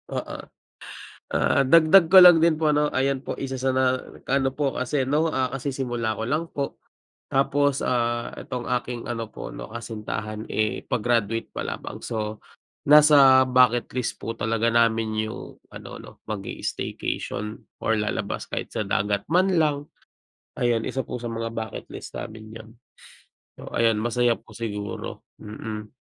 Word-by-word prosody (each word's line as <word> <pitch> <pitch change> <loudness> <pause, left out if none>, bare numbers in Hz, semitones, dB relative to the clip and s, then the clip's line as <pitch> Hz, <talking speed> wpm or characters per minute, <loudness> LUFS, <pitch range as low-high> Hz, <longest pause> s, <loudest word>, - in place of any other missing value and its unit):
oo. - - -4 0.9
Ah, 140 - +3
dagdag 165 +4 +6
ko 190 - +11
lang 175 -3 +9
din 160 -2 +3
po 150 -2 +2
'no, 150 0 +2
ayan 135 +1 0
po - - -5
isa 135 -1 -4
sa 130 +1 0
na, 130 0 +2 0.3
ano 135 0 +2
po 140 -1 -1
kasi 130 +1 -1
ano, 155 +3 +1
ah, 130 -1 +1
kasisimula 120 -5 -2
ko 110 - -2
lang 155 +5 0
po, 140 -1 -3 0.5
tapos, 140 +1 +1
ah, 120 -1 0
itong 125 -1 -5
aking 120 -1 -7
ano 115 -2 -4
po - - -8
ano - - -8
kasintahan 110 -1 -6
eh 110 0 -1
pa-graduate 115 -2 0
pa - - -4
lamang. - - -6
So 110 -1 -4 0.5
nasa 140 -3 +8
bucket 125 -1 +4
list 125 -2 -2
po 115 - -5
talaga 115 0 0
namin 110 -2 +2
'yung - - -9
ano - - -10
'no, - - -12
mag-i-staycation 105 0 -4 0.2
or 110 - +2
lalabas 105 0 -3
kahit - - -5
sa - - -1
dagat 100 0 0
man 185 +3 +3
lang. 150 -2 +2 0.8
Ayan, 120 -2 +1
isa 130 -2 -2
po 125 - -6
sa 120 - -4
mga 115 0 -4
bucket 110 -2 -5
list - - -9
namin 110 0 -8
aun. 110 0 -11 0.9
O - - -10
ayan 115 -1 +4
masaya 120 +1 +2
po 110 - -18
siguro, 105 -3 -5 0.2
mm. 105 0 -7
120 Hz, 155 wpm, -24 LUFS, 110-135 Hz, 0.9 s, ko